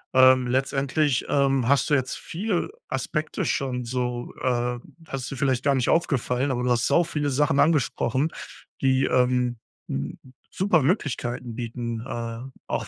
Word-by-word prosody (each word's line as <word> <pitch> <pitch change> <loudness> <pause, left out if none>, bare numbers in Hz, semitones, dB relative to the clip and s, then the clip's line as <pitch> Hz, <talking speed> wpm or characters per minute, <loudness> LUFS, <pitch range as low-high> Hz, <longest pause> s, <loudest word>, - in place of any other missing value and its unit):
Ähm, 130 -1 +6
letztendlich, 135 +2 +1
ähm, 135 -3 +2
hast 140 -1 +3
du 150 - +2
jetzt 130 -2 +1
viel 195 - -2 0.2
Aspekte 155 -1 -2
schon 125 -2 -1
so, 125 0 -3
äh 125 -1 0 0.3
hast 135 -2 -4
du - - -4
vielleicht 130 -1 0
gar 140 -1 +3
nicht 125 -2 +1
aufgefallen, 135 -4 +1
aber 125 -1 -1
du 125 - +1
hast 120 -1 +2
sau 170 - +4
viele 150 -3 -2
Sachen 140 +1 +2
angesprochen, 140 -2 +2 0.5
die, 130 0 +3
ähm, 125 -1 +2 0.3
hm, 70 +1 -3 0.3
super 180 -5 +2
Möglichkeiten 125 - -1
bieten, 120 -1 -4
äh, 115 -2 -4 0.3
auch - - -2
130 Hz, 150 wpm, -25 LUFS, 125-140 Hz, 0.5 s, Ähm